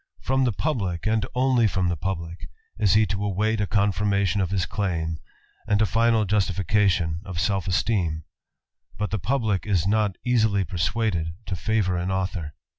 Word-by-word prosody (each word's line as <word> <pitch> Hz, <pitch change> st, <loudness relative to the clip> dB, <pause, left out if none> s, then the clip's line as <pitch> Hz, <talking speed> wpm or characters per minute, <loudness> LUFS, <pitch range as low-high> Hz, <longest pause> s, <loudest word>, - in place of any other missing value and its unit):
From 135 Hz, 0 st, +2 dB
the 120 Hz, -, +2 dB
publick, 95 Hz, -, -2 dB
and 110 Hz, 0 st, +1 dB
only 125 Hz, -3 st, +3 dB
from 95 Hz, -2 st, 0 dB
the 85 Hz, -, 0 dB
publick, 85 Hz, -3 st, -5 dB, 0.3 s
is 105 Hz, -3 st, +3 dB
he 110 Hz, 0 st, +5 dB
to 100 Hz, -, -2 dB
*^t 105 Hz, +2 st, 0 dB
a 100 Hz, -, 0 dB
confirmation 100 Hz, -1 st, +1 dB
of 95 Hz, -, 0 dB
his 95 Hz, -2 st, 0 dB
claim, 80 Hz, -5 st, -2 dB, 0.5 s
and 105 Hz, -1 st, +2 dB
a 110 Hz, -, +4 dB
final 115 Hz, 0 st, +2 dB
justification 95 Hz, -3 st, +1 dB
of 95 Hz, -4 st, -7 dB
stf 95 Hz, +1 st, 0 dB
esteem; 90 Hz, -4 st, 0 dB, 0.7 s
but 105 Hz, 0 st, -2 dB
the 105 Hz, -, -1 dB
publick 110 Hz, -5 st, -1 dB
is 95 Hz, -5 st, +1 dB
not 105 Hz, -1 st, +1 dB
easily 110 Hz, -5 st, +2 dB
persuaded 85 Hz, -1 st, -1 dB
to -, -, -4 dB
^vour 95 Hz, -2 st, 0 dB
an 90 Hz, -, -2 dB
author. 95 Hz, -5 st, -3 dB
100 Hz, 165 wpm, -24 LUFS, 90-110 Hz, 0.7 s, he